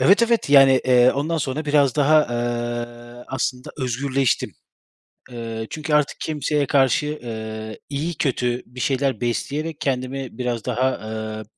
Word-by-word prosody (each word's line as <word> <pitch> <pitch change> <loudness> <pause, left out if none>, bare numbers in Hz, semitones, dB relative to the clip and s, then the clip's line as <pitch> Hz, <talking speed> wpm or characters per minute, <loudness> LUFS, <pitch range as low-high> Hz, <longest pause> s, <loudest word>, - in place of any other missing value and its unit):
Evet, 200 +5 +5
evet, 235 -9 +1
yani, 135 -2 +7
eee, 125 -1 +5
ondan 150 +4 -1
sonra 145 +1 -2
biraz 145 -3 +3
daha, 155 +1 +5
eee, 120 0 -4
aslında 130 -1 -3
özgürleştim. 130 +1 0 0.8
Eee, 115 -2 -5
çünkü 155 0 -4
artık 150 -2 +2
kimseye 150 -1 -1
karşı, 140 +3 +2
ııı, 110 -1 -6
iyi, 150 +5 -2
kötü 125 -3 -1
bir 125 +1 -12
şeyler 135 -2 0
besleyerek 145 +6 -2
kendimi 130 -2 -3
biraz 120 -3 -2
daha, 125 +1 +1
ııı, 110 -1 -5
130 Hz, 135 wpm, -22 LUFS, 120-145 Hz, 0.8 s, yani